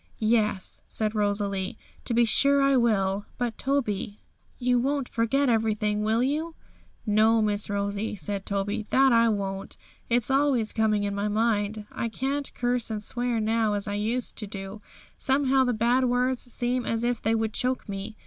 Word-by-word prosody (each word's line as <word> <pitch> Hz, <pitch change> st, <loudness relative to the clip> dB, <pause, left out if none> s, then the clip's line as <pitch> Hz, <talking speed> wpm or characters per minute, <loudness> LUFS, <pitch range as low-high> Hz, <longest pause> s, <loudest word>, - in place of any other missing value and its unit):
'Yes,' 215 Hz, -3 st, +2 dB
said 215 Hz, -1 st, -1 dB
Rosalie, 205 Hz, -2 st, -1 dB, 0.3 s
'to 235 Hz, -, -2 dB
be 235 Hz, 0 st, +5 dB
sure 280 Hz, +5 st, +4 dB
I 275 Hz, 0 st, +4 dB
will; 205 Hz, -5 st, +1 dB
but, 240 Hz, -3 st, -2 dB
Toby, 215 Hz, -7 st, -1 dB, 0.4 s
you 245 Hz, -1 st, +2 dB
won't 275 Hz, +1 st, -1 dB
forget 235 Hz, +5 st, +1 dB
everything, 215 Hz, -2 st, +1 dB
will 220 Hz, +3 st, +2 dB
you?' 310 Hz, +5 st, -2 dB, 0.5 s
'No, 220 Hz, +1 st, +4 dB
Miss 210 Hz, -1 st, +1 dB
Rosie,' 200 Hz, +1 st, -2 dB
said 195 Hz, +2 st, -3 dB
Toby, 200 Hz, +2 st, -2 dB
'that 265 Hz, -1 st, +4 dB
I 230 Hz, 0 st, +5 dB
won't! 195 Hz, -2 st, -3 dB, 0.3 s
It's 240 Hz, +1 st, +1 dB
always 270 Hz, -5 st, +2 dB
coming 215 Hz, -2 st, +1 dB
in 200 Hz, 0 st, -2 dB
my 200 Hz, +1 st, -1 dB
mind; 210 Hz, -1 st, 0 dB
I 235 Hz, -, -3 dB
can't 275 Hz, +4 st, -3 dB
curse 245 Hz, -1 st, 0 dB
and 215 Hz, -1 st, -3 dB
swear 245 Hz, 0 st, -1 dB
now 220 Hz, -1 st, +1 dB
as 205 Hz, +1 st, -3 dB
I 205 Hz, -, -2 dB
used 225 Hz, +4 st, -2 dB
to 210 Hz, -, -4 dB
do; 195 Hz, +1 st, -7 dB, 0.3 s
somehow 270 Hz, -1 st, +2 dB
the 250 Hz, -, +1 dB
bad 240 Hz, +3 st, +2 dB
words 250 Hz, +1 st, +1 dB
seem 245 Hz, +1 st, -1 dB
as 230 Hz, 0 st, -2 dB
if 240 Hz, -1 st, -1 dB
they 225 Hz, +1 st, +1 dB
would 220 Hz, -1 st, -1 dB
choke 255 Hz, +1 st, -1 dB
me. 200 Hz, +2 st, -6 dB
225 Hz, 170 wpm, -26 LUFS, 205-245 Hz, 0.5 s, be